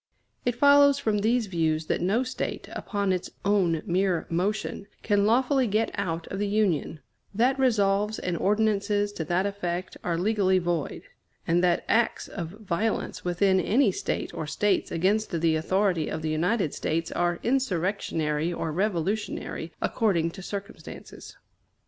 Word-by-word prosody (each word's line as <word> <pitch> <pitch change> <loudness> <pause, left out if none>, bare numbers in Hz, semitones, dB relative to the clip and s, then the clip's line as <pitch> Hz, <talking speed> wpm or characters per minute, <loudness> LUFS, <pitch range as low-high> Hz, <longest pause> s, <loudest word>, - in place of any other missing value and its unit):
It 245 -1 +1
follows 285 +1 +6
from 220 -7 0
these 230 +3 +2
views 160 -4 0
that - - -1
no 205 +8 +2
State, 255 - -4
upon 200 -3 -1
its 180 - -3 0.2
own 185 -6 +2
mere 180 -1 +1
motion, 200 +3 -2 0.2
can 205 -1 +2
lawfully 260 +3 +3
get 215 +2 0
out 170 -5 -3
of 195 - -4
the 205 - 0
Union; 195 -7 0 0.3
that 255 +5 +2
resolves 210 -4 +2
and 180 -1 -2
ordinances 205 +1 +1
to 165 - -3
that 175 +4 +1
effect 185 -3 -3
are 170 -1 -1
legally 190 0 +2
void; 175 -4 -2 0.4
and 175 +2 +2
that 175 -1 +2
acts 230 0 +1
of 175 -4 -5
violence 210 +2 -3
within 190 +2 +2
any 225 +4 +3
State - - -3
or 155 - -4
States 205 +4 0
against 190 +1 +1
the 160 -1 +2
authority 180 0 +1
of 160 - -4
the 160 - -1
United 175 +2 0
States 165 +1 -2
are 175 0 0
insurrectionary 175 - 0
or 165 -2 -3
revolutionary, 190 -1 -2
according 170 -7 +1
to 190 - -10
circumstances. 200 +2 -8
195 Hz, 150 wpm, -26 LUFS, 170-215 Hz, 0.4 s, follows